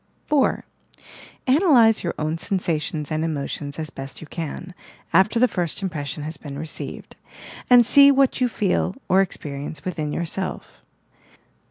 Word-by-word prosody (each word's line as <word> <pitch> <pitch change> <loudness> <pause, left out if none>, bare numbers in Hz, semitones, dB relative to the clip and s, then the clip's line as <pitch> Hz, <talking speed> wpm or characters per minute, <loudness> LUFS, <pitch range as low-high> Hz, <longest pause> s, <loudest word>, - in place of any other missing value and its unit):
4. 295 -3 +1 0.8
Analyse 255 - +5
your 170 - -2
own 155 +1 -1
sensations 160 -5 -2
and 155 +1 0
emotions 145 -2 -4
as 155 -3 -4
best 135 0 -8
you - - -9
can, 170 +3 -6 0.4
after 190 +6 +4
the 250 - +5
first 175 -2 -2
impression 150 -5 -4
has 155 0 -6
been 140 -2 -8
received, 155 +1 -6 0.5
and 245 -1 +7
see 280 +4 +7
what 275 -1 +3
you 250 - +3
feel 195 -3 0
or 190 +2 +4
experience 145 -4 -5
within 160 -5 -3
yourself. 170 +4 -4
170 Hz, 140 wpm, -23 LUFS, 150-220 Hz, 0.8 s, and